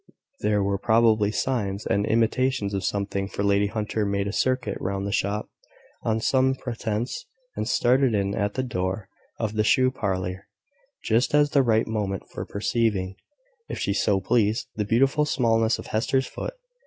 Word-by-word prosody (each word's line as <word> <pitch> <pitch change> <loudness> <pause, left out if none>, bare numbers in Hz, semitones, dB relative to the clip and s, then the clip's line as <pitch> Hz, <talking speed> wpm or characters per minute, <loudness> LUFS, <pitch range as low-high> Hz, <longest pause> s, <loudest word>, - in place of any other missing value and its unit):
There 105 -1 +1
were 100 0 0
probably 110 -2 +3
signs 105 -4 -1
and 100 +2 +1
intimations 115 -1 +1
of 100 -1 -2
something; 100 0 -1
for 100 - -4
Lady 100 0 +3
Hunter 110 0 -2
made 100 -1 0
a 100 - -3
circuit 130 +1 0
round 100 +1 -2
the 100 - -2
shop, 100 +1 -1 0.5
on 110 0 0
some 130 +3 +2
pretence, 120 -1 -4 0.3
and 110 - -2
stared 125 +4 +3
in 100 -1 0
at 100 0 -1
the 130 - 0
door 95 -4 -3 0.3
of 110 -1 -1
the 110 0 +1
shoe 130 +4 +4
parlour, 95 -5 -3 0.6
just 120 +6 +2
at 145 -1 +4
the 140 - +5
right 115 -3 +2
moment 100 -4 -2
for - - -6
perceiving, 100 -3 0 0.5
if - - -4
she 100 - 0
so 100 -1 +2
pleased, 110 +2 +1
the 105 - -1
beautiful 135 +7 +3
smallness 115 -5 +2
of - - -8
Hester's 130 +4 +1
foot. - - -6
110 Hz, 165 wpm, -25 LUFS, 100-120 Hz, 0.6 s, the